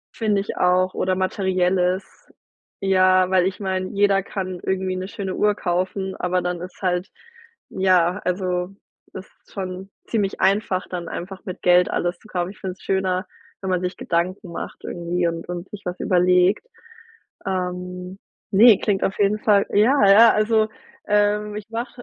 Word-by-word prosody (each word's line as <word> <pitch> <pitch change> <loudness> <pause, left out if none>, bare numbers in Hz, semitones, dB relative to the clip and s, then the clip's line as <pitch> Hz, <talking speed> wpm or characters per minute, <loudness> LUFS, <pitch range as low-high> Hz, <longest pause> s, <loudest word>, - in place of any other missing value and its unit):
Finde 210 -3 +1
ich 205 - -6
auch 185 +1 +2
oder 185 0 0
Materielles. 185 -1 -1 0.5
Ja, 185 -1 +4
weil 185 -1 +4
ich 190 - -4
meine, 190 -1 -2
jeder 200 -1 +2
kann 185 -2 -5
irgendwie 190 -1 -1
'ne 185 +1 -4
schöne 195 -2 -5
Uhr 210 0 +2
kaufen, 190 +1 -2
aber 180 0 0
dann 180 -1 -3
ist 185 +2 -10
halt 180 +1 0 0.6
ja, 185 0 +2
also, 180 0 -2 0.4
das - - -8
ist - - -28
schon 190 -1 -6 0.2
ziemlich 205 -4 -1
einfach, 195 -2 +1
dann 175 -2 -5
einfach 190 +2 -7
mit 185 - -7
Geld 180 0 +5
alles 175 +1 -2
zu - - -18
kaufen. 180 -2 -3
Ich 210 - -17
finde 185 -2 -4
es - - -22
schöner, 190 -1 0 0.4
wenn 190 - -4
man 180 -1 +1
sich 180 0 -3
Gedanken 180 +2 -2
macht - - -7
irgendwie 175 0 -2
und 165 0 -5
und 180 +1 -5
sich 205 -1 -8
was 180 0 -4
überlegt. 180 +2 +3 0.8
Ähm, 180 0 -4 0.3
ne, 215 +1 +7
klingt 200 -3 0
auf 195 - -1
jeden 205 +1 +2
Fall 205 -2 +3
ja, 240 +8 +4
ja, 225 +4 +8
also, 215 0 +2 0.4
ähm, 210 0 +1
ich 210 -1 -6
mach 230 +2 -4
185 Hz, 165 wpm, -22 LUFS, 180-200 Hz, 0.8 s, ja